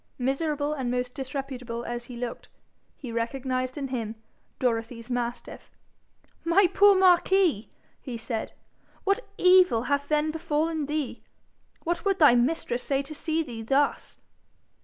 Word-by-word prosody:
Miserable 290 +3 -1
and 265 -5 -3
most 250 0 -2
disreputable 260 -3 -5
as 240 0 -4
he 245 -1 -9
looked, 240 -1 -6 0.5
he 255 -5 -7
recognised 255 +2 -2
in 275 -2 -3
him 230 -4 -3 0.4
Dorothy's 230 0 -2
mastiff. 240 -1 -4 0.7
'My 345 +4 +4
poor 400 +3 +5
Marquis!' 365 - +4 0.3
he 250 -4 -6
said, 225 0 -4 0.5
'what 395 +1 +2 0.2
evil 365 -10 +5
hath 285 +2 -1
then 305 0 +2
befallen 315 -1 -1
thee? 295 -3 -3 0.6
What 340 +1 -1
would 390 -1 +1
thy 295 -8 +7
mistress 245 0 +1
say 275 0 0
to 310 - -8
see 320 +1 -1
thee 235 -6 -7
thus?' 275 +5 0
270 Hz, 135 wpm, -27 LUFS, 240-315 Hz, 0.7 s, thy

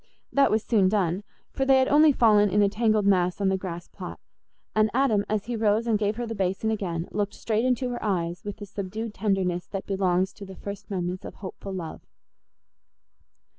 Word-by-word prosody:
That 280 -1 +5
was 220 0 +1
soon 200 -5 +3
done, 190 -2 0 0.3
for 270 - -1
they 270 0 +5
had 260 0 +3
only 300 +1 +6
fallen 210 -5 +4
in 205 +2 +3
a 200 - +4
tangled 215 -1 +1
mass 180 -2 +2
on 195 -1 +2
the 190 - +2
grass 175 -2 -6
plot, - - -8 0.6
and 215 0 +4
Adam, 245 -6 +3
as 210 -2 -1
he 240 0 -3
rose 220 0 +2
and 220 -3 +1
gave 210 0 0
her 240 +1 -3
the 225 - -4
basin 195 +2 -1
again, 175 -6 -2
looked 205 0 -2
straight 225 +1 -1
into 255 0 +1
her 240 - -5
eyes 175 -4 -1
with 205 0 -6
the 205 - -7
subdued 205 +3 -5
tenderness 190 -4 -1
that 195 -1 -5
belongs 190 -1 +1
to 205 - -11
the 190 -1 -9
first 200 +1 -8
moments 180 -1 -3
of - - -8
hopeful 195 0 -8
love. 175 -4 -6
205 Hz, 205 wpm, -26 LUFS, 190-220 Hz, 0.6 s, only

